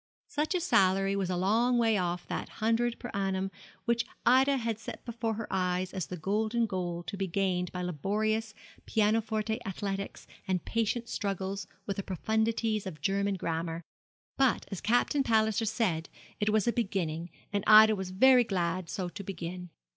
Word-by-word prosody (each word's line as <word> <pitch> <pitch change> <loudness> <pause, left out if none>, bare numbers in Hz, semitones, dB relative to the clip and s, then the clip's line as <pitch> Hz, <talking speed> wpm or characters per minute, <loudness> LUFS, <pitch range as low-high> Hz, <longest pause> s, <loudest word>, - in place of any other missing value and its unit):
Such 305 +5 -1
a - - +2
salary 195 - +3
was 195 -2 -1
a 180 - 0
long 230 +7 +3
way 225 -2 +3
off 175 -2 -1
that - - -4
hundred 230 +2 +1
per 245 - -7
annum 195 -1 -1 0.3
which 235 0 +2 0.2
Ida 265 +3 +5
had 230 -3 -2
set - - -8
before 230 -2 -2
her 220 0 -5
eyes 180 0 0
as 190 -3 -3
the 180 - -6
golden 215 +7 0
goal 175 -4 -3
to 200 - -5
be 195 -1 -2
gained 180 -1 0
by 180 0 -4
laborious 215 +6 -1 0.3
pianoforte 220 +1 +1
athletics 195 +1 -4 0.2
and 185 -2 -1
patient 230 +1 -1
struggles 195 -2 -3 0.2
with 200 - -3
the - - 0
profundities 220 +2 0
of 160 -5 -7
German 200 0 +1
grammar; 165 -1 -3 0.5
but, 265 -3 +2
as 195 - -4
Captain 245 +5 +2
Palliser 220 -2 +2
paid, 195 -8 0 0.3
it 210 - +1
was 215 -1 +2
a 235 - +3
beginning; 175 -7 -2 0.2
and 200 -1 0
Ida 215 0 +9
was 190 -2 -4
very 250 +6 +6
glad 180 -4 -1
so 185 -4 -3
to 190 +3 -7
begin. 180 -1 -6
200 Hz, 170 wpm, -30 LUFS, 185-225 Hz, 0.5 s, Ida